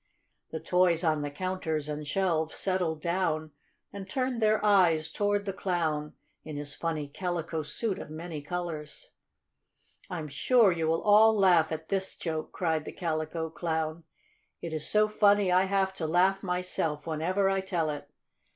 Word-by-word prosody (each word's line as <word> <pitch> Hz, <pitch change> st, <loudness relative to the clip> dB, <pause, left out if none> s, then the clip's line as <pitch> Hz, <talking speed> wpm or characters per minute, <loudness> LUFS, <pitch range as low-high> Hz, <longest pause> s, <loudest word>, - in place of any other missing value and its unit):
The 160 Hz, -, -5 dB
toys 175 Hz, +1 st, +2 dB
on 155 Hz, -3 st, +2 dB
the 145 Hz, -, -3 dB
counters 160 Hz, -2 st, -3 dB
and 150 Hz, 0 st, -5 dB
shelves 160 Hz, -2 st, 0 dB
settled 180 Hz, -5 st, -1 dB
down 165 Hz, -3 st, -1 dB, 0.4 s
and 195 Hz, -1 st, -8 dB
turned 255 Hz, 0 st, -1 dB
their 215 Hz, 0 st, +3 dB
eyes 175 Hz, -6 st, +4 dB
toward 205 Hz, 0 st, 0 dB
the 195 Hz, -, -2 dB
Clown 160 Hz, -6 st, -2 dB, 0.3 s
in 155 Hz, -2 st, -7 dB
his 145 Hz, 0 st, -3 dB
funny 160 Hz, -3 st, -3 dB
calico 170 Hz, 0 st, -3 dB
suit 200 Hz, +6 st, -3 dB
of -, -, -8 dB
many 155 Hz, 0 st, -6 dB
colors. 170 Hz, -, -6 dB, 1.0 s
"I'm 165 Hz, -5 st, -4 dB
sure 215 Hz, -, +4 dB
you 165 Hz, -2 st, -1 dB
will 165 Hz, +1 st, +1 dB
all 215 Hz, +1 st, +6 dB
laugh 175 Hz, -5 st, +4 dB
at 160 Hz, 0 st, -5 dB
this 190 Hz, -1 st, -1 dB
joke!" 160 Hz, -2 st, -4 dB
cried 160 Hz, -3 st, -1 dB
the -, -, -6 dB
Calico 160 Hz, -1 st, -3 dB
Clown. 160 Hz, -1 st, -2 dB, 0.6 s
"It 165 Hz, -2 st, -6 dB
is 155 Hz, -1 st, -1 dB
so 215 Hz, 0 st, +4 dB
funny 205 Hz, -2 st, +3 dB
I 185 Hz, +1 st, +4 dB
have 190 Hz, 0 st, +1 dB
to 165 Hz, -4 st, -3 dB
laugh 185 Hz, +4 st, +3 dB
myself 180 Hz, -5 st, -2 dB
whenever 170 Hz, +5 st, 0 dB
I 195 Hz, 0 st, +1 dB
tell 175 Hz, -5 st, -1 dB
it. 145 Hz, -, -7 dB
170 Hz, 160 wpm, -29 LUFS, 155-190 Hz, 1.0 s, all